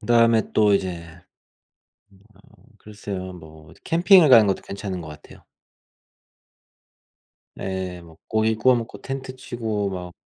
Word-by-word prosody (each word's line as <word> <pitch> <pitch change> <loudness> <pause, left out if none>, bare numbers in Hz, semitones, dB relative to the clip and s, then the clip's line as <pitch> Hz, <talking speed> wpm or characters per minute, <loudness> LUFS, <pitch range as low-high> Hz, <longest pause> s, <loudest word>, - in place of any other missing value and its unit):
그다음에 115 -2 +2
또 105 -2 +3
이제 90 -3 -3 1.4
어 - - -23 0.3
글쎄요 100 -3 -8
뭐 80 -2 -14
이제 - - -19
캠핑을 175 -1 +5
가는 115 -5 +7
것도 95 - -1
괜찮은 100 -2 -6
것 80 - -10
같아요. 75 0 -14 2.1
네. 95 -2 -5
뭐 80 -2 -16
고기 110 0 +1
구워 125 +4 +3
먹고 115 -1 -6
텐트 135 -1 -6
치고 110 -5 -4
막 90 -2 -7
100 Hz, 240 characters per minute, -22 LUFS, 90-115 Hz, 2.1 s, 가는